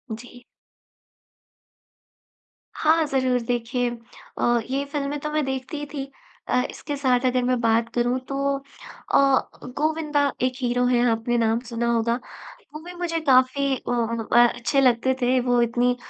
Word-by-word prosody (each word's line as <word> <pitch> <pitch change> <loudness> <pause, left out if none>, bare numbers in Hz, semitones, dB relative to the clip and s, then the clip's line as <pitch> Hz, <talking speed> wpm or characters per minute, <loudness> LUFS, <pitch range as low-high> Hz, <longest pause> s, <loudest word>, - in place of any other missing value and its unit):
जी। 245 +2 -13 2.3
हाँ, 320 0 +3
ज़रूर 260 -2 +1
देखिए 240 +1 -1 0.5
अ, 240 0 +2
ये 275 +1 -1
फ़िल्में 290 0 -2
तो 300 - -4
मैं 305 0 0
देखती 265 +2 -4
ही 295 - -4
थी। 275 -1 -5 0.4
अ, 250 - +2
इसके 290 - -6
साथ 255 -2 +1
अगर 255 0 +2
मैं 250 0 +1
बात 230 0 +2
करूँ 245 +1 +1
तो 275 0 0
अ, 275 0 0 0.3
गोविंदा 300 -2 +1
एक 255 0 +1
हीरो 245 0 +1
है 245 -1 +3
आपने 230 +2 0
नाम 225 0 +2
सुना 235 0 -2
होगा, 235 0 +1 0.6
वो 305 - -6
भी 355 +1 -9
मुझे 345 -2 -2
काफ़ी 265 +2 +3
ओ - - -1
अ, 230 +1 +3
अच्छे 275 +4 0
लगते 255 0 +3
थे 250 +1 +3
वो 245 -1 +2
इतनी 240 +1 +1
255 Hz, 150 wpm, -24 LUFS, 240-280 Hz, 2.3 s, हाँ